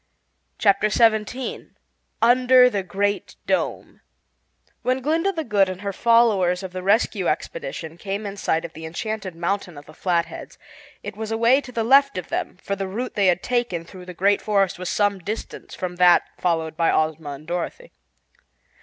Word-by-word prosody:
Chapter 210 -1 +3
Seventeen 225 +3 0 0.5
Under 250 +1 +6
the 200 - -1
Great 200 +2 -2
Dome - - -2 0.8
When 255 +1 0
Glinda 325 +8 +1
the 325 -4 -3
Good 200 -7 +2
and 185 0 -6
her 200 -1 -3
followers 205 -6 +3
of 190 - -6
the 185 - -4
Rescue 200 +5 +1
Expedition 475 - -4
came 200 +1 -4
in 200 -1 -5
sight 165 -4 -1
of 165 - -9
the 160 - -10
Enchanted 195 +1 -5
Mountain 175 -1 -3
of 145 - -11
the 155 - -14
Flatheads, 170 0 -2 0.5
it 205 -1 -6
was 220 +1 -5
away 230 +5 +3
to 265 -2 -11
the 230 -2 -1
left 275 +1 +4
of 180 - -5
them, - - -3
for 200 - -2
the 195 0 -4
route 235 +7 -4
they 200 -2 +2
had 180 -1 +2
taken 240 -9 -1
through 180 +1 -12
the 180 - -8
Great 200 +3 +2
Forest 195 -4 +1
was 180 - -4
some 205 -2 +1
distance 210 +6 -7
from 180 -1 -5
that 180 -1 +6 0.2
followed 165 -3 -1
by 165 0 +2
Ozma 155 -2 -1
and 140 +2 -11
Dorothy. 180 - -5
200 Hz, 175 wpm, -23 LUFS, 180-230 Hz, 0.8 s, Under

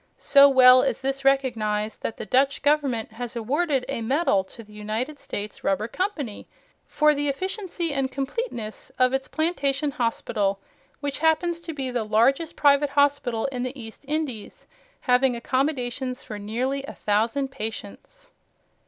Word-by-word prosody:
So 280 0 +6
well 255 -1 +8
is - - -1
this 270 0 -2
recognized, 225 -6 0
that 225 - -4
the - - -6
Dutch 270 +6 +2
Government 280 -7 +1
has 240 +1 -6
awarded 270 +4 0
a 275 -4 -3
medal 250 - +2
to 230 - -12
the 210 0 -18
United 220 +8 -4
States 205 +1 -6
Rubber 195 +3 0
Company 300 - -4 0.4
for 300 0 +3
the 290 0 0
efficiency 360 +1 -3
and 270 -1 -1
completeness 270 - -4
of 255 0 +3
its 270 0 -1
plantation 295 -3 0
hospital, 215 -5 -1 0.4
which 285 -1 -3
happens 330 +2 +1
to 335 -1 -6
be 265 -3 -3
the 245 -2 -1
largest 240 +9 +2
private 285 0 +4
hospital 285 -5 +1
in 250 -2 -4
the 255 +2 -4
East 225 +2 -9
Indies, 290 -8 -4 0.4
having 250 -1 +3
accommodations 255 0 -2
for 210 -4 -7
nearly 250 +7 -2
a - - -9
thousand 225 +6 0
patients. 270 - -8
265 Hz, 150 wpm, -25 LUFS, 225-285 Hz, 0.4 s, well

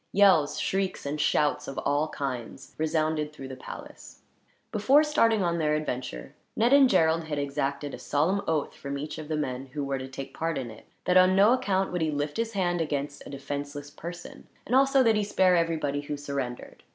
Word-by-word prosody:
Yells, 160 -7 +4
shrieks, 195 -4 -1
and 150 +2 -2
shouts 150 -1 +1
of 135 - -6
all 145 +2 +2
kinds 135 -4 -6
resounded 155 -1 0
through 135 -3 -9
the 130 - -7
palace. - - -11 0.5
Before 265 +8 +4
starting 230 -9 +2
on 170 -1 0
their 150 -1 +2
adventure, 125 - -4 0.2
Ned 235 +4 +3
and 275 -2 +7
Gerald 165 -4 +3
had 150 -2 -3
exacted 140 0 -2
a - - -7
solemn 170 +8 +1
oath, 155 -3 0
from 140 0 -5
each 150 +3 -6
of 155 - -7
the 155 0 -1
men 130 -2 -3
who 145 -1 -2
were 135 -1 -2
to 130 - -6
take 135 0 -8
part 165 -1 -2
in 125 -4 -4
it, 110 - -15 0.2
that 180 - +4
on 185 0 +6
no 205 +5 +6
account 195 -6 0
would 180 -1 -2
he 160 - +1
lift 145 0 -2
his 230 0 -2
hand 175 -3 0
against 145 -2 -3
a - - -9
defenseless 145 +1 -6
person; 175 +3 -9 0.2
and 245 - -4
also 270 0 +5
that 225 -2 +4
he 210 - +1
spare 190 -2 +3
everybody 160 -4 0
who 145 0 -5
surrendered. 140 -4 -5
155 Hz, 200 wpm, -27 LUFS, 140-185 Hz, 0.5 s, and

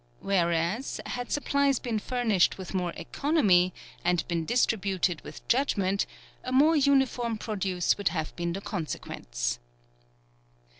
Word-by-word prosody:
Whereas, 175 +5 0
had 245 -1 -4
supplies 280 -2 +2
been 230 -3 -2
furnished 225 -5 +1
with 190 -1 -7
more 180 -2 -1
economy, 200 - +2 0.3
and 175 -1 +1
been 170 -2 -1
distributed 195 -6 +1
with 150 - -11
judgment, 200 -7 +1 0.4
a 255 - -4
more 295 +5 +5
uniform 265 -5 +2
produce 195 -4 0
would 200 - 0
have 160 -2 -2
been 170 -1 -2
the 195 - -4
consequence. - - -4
195 Hz, 120 wpm, -28 LUFS, 175-245 Hz, 0.4 s, more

